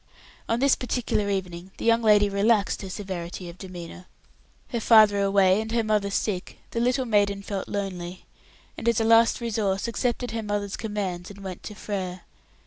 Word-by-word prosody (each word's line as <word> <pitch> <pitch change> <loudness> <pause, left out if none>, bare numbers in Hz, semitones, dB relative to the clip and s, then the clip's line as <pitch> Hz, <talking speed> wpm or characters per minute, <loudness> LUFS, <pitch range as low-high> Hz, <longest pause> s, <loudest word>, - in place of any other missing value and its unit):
On 230 +1 +1
this 275 +1 +4
particular 240 -4 -1
evening 185 -2 -3
the - - -6
young 230 0 +4
lady 210 -2 +5
relaxed 200 +1 +2
her 195 - -6
severity 180 -2 -6
of 170 - -12
demeanour. 180 -1 -9 0.6
Her 235 - -2
father 215 -3 +6
away, 195 0 +4
and 220 0 -6
her 235 -1 +2
mother 210 -2 +1
sick, 195 -2 -2
the 230 - -2
little 250 +2 +1
maiden 200 -3 +1
felt 195 -1 -4
lonely, 185 -3 -5 0.5
and 235 - +1
as 235 - +2
a - - +2
last 230 +1 +5
resource 215 -4 -1
accepted 240 0 -1
her 225 0 -2
mother's 205 -2 -2
commands 195 -5 -4
and 200 -1 -11
went 185 -2 -6
to 210 - -8
Frere. 185 -3 -4
205 Hz, 175 wpm, -25 LUFS, 190-225 Hz, 0.6 s, father